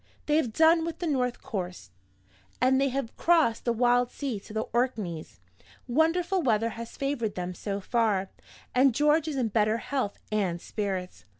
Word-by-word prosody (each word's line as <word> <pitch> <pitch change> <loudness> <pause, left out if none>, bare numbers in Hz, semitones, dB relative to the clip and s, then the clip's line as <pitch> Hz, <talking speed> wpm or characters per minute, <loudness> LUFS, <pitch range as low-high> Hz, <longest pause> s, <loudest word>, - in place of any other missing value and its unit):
They 300 0 +2
have 255 -8 +1
done 325 +5 +5
with 330 0 -4
the 350 - -4
north 255 -6 -1
coast 180 - -5 0.7
and 265 +1 +3
they 275 - +3
have 265 -3 -3
crossed 320 -10 +3
the 240 - +2
wild 245 +1 +3
sea 260 -7 -4
to 195 - -14
the 220 +1 -2
Orkneys. 215 -10 -2 0.5
Wonderful 335 +7 +2
weather 230 -5 +2
has 230 +1 -8
favored 275 -7 -2
them 180 0 -3
so 200 +2 -4
far; 200 -3 0 0.4
and 255 -1 +4
George 300 +2 +3
is 305 - -2
in 240 -4 +1
better 215 +1 +2
health 255 -4 -2
and 190 -5 0
spirits. 190 -2 -4
240 Hz, 170 wpm, -28 LUFS, 210-280 Hz, 0.7 s, done